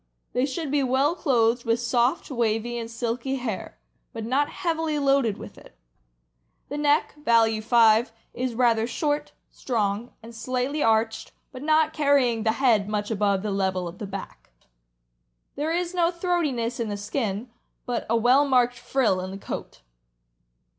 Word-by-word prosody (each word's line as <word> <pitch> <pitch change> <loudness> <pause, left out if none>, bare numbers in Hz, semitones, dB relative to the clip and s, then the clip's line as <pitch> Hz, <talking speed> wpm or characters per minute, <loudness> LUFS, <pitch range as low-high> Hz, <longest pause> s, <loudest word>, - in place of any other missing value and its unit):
They 250 +2 +1
should 285 +1 -4
be 290 -1 +2
well 265 +4 +2
clothed 240 -7 +1
with 230 +1 +1
soft, 240 +6 0
wavy, 235 -1 0
and 230 -1 -4
silky 235 +3 -2
hair, 240 -7 -5 0.4
but 225 -2 -5
not 275 +5 +1
heavily 325 -3 -2
loaded 275 -7 +2
with - - -11
it. - - -18 0.9
The 290 - -4
neck 295 +1 +2
(value 225 -3 +3
5) 225 0 +4 0.2
is 250 -1 -3
rather 230 -2 +2
short, 290 +4 -2 0.2
strong, 220 -1 -2
and 230 +1 -11
slightly 255 +5 -2
arched, 225 -1 +1 0.2
but 255 -1 -9
not 310 +1 +2
carrying 280 -6 +2
the 220 0 +1
head 225 -5 +2
much 210 0 -2
above 200 -2 +1
the 210 - -2
level 190 -2 -1
of 170 +2 -9
the 210 - -5
back. 195 0 -8 1.1
There 300 +3 -2
is 350 +1 -1
no 345 -2 +2
throatiness 325 -10 -1
in 230 -2 -2
the 205 - -3
skin, 210 +1 -3 0.3
but 245 -1 -3
a 230 - +3
well 250 +5 +5
marked 245 -2 +2
frill 240 -7 +1
in 185 - -5
the 195 - -7
coat. - - -7
240 Hz, 160 wpm, -25 LUFS, 220-280 Hz, 1.1 s, well